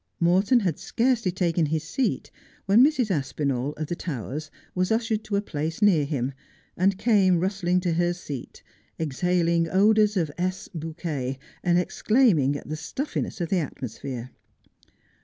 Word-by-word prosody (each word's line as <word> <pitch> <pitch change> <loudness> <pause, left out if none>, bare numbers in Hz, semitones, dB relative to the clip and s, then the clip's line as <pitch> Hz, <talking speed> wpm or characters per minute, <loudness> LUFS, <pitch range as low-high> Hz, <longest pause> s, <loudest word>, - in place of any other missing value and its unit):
Morton 190 +8 +4
had 175 -7 -1
scarcely 235 -5 +1
taken 170 -3 +1
his 155 +1 -1
seat 260 -6 -2 0.3
when 205 +6 +6
Mrs. 265 -7 +2
Aspinall, 140 -3 -1
of 155 - -4
the 175 - -3
Towers, 150 - -5 0.2
was 185 +2 0
ushered 225 -1 0
to 205 - -2
a 200 - +1
place 160 -3 -3
near 190 -9 +4
him, 135 -2 -2 0.4
and 190 +2 +2
came 195 -5 +3
rustling 180 -1 +1
to 175 -2 0
her 175 +1 +2
seat, 150 -7 -7 0.4
exhaling 170 +2 +1
odours 210 +2 +4
of 160 -5 0
Lss. 185 +1 -2
bouquet, 155 -5 -4 0.3
and 175 -1 +3
exclaiming 180 - +3
at - - -7
the 155 - -3
stuffiness 210 - -4
of 170 - -2
the 190 - +2
atmosphere. 130 -3 -6
175 Hz, 150 wpm, -25 LUFS, 150-200 Hz, 0.4 s, when